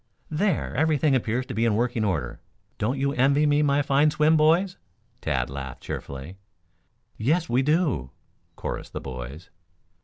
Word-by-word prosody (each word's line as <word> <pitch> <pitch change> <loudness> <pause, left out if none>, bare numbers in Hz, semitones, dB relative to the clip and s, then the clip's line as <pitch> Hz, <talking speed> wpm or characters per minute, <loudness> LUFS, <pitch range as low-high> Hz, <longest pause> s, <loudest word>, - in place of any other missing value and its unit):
"There, 175 +2 0
everything 155 -2 +2
appears 125 0 0
to - - -6
be 115 - 0
in 115 -3 +2
working 120 0 0
order. 80 - -2 0.4
Don't 120 +6 0
you 140 +1 0
envy 140 +3 +3
me 145 0 +3
my 145 -1 +2
fine 140 +2 +3
swim, 155 +1 +3
boys?" 165 +5 +3 0.4
Tad - - 0
laughed 70 -1 -7
cheerfully. 70 +7 -6 0.8
"Yes, 155 +9 +1
we 125 +2 +2
do," 145 - +1 0.5
chorused - - -5
the - - -3
boys. 65 +7 -8
135 Hz, 150 wpm, -25 LUFS, 105-150 Hz, 0.8 s, envy